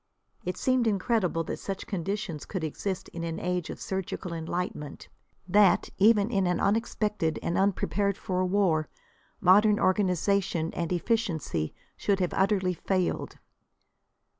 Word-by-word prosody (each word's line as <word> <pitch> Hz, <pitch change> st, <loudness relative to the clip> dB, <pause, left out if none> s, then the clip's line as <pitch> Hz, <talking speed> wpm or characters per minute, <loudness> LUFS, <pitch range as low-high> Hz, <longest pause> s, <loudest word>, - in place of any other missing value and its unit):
It 180 Hz, -, -3 dB
seemed 255 Hz, -2 st, +2 dB
incredible 195 Hz, -4 st, +1 dB
that -, -, -5 dB
such 195 Hz, -1 st, -5 dB
conditions 195 Hz, -3 st, -3 dB
could 185 Hz, -5 st, -4 dB
exist 190 Hz, +5 st, -3 dB
in 170 Hz, -, -6 dB
an 165 Hz, -1 st, -3 dB
age 180 Hz, -1 st, -2 dB
of -, -, -6 dB
surgical 190 Hz, -2 st, -4 dB
enlightenment; 165 Hz, -3 st, -4 dB, 0.4 s
that, 195 Hz, 0 st, +4 dB
even 210 Hz, +1 st, +5 dB
in 195 Hz, -4 st, +2 dB
an 180 Hz, -1 st, +1 dB
unexpected 210 Hz, -5 st, 0 dB
and 170 Hz, -, -1 dB
unprepared 200 Hz, +1 st, +1 dB
for 185 Hz, -1 st, -1 dB
war, 180 Hz, -5 st, +1 dB, 0.5 s
modern 205 Hz, +3 st, +5 dB
organisation 185 Hz, -2 st, +1 dB
and 170 Hz, -1 st, -3 dB
efficiency 175 Hz, -, -1 dB, 0.2 s
should 200 Hz, -1 st, +1 dB
have 180 Hz, -2 st, 0 dB
utterly 190 Hz, -2 st, +2 dB
failed. 185 Hz, +1 st, -1 dB
185 Hz, 130 wpm, -28 LUFS, 175-205 Hz, 0.5 s, even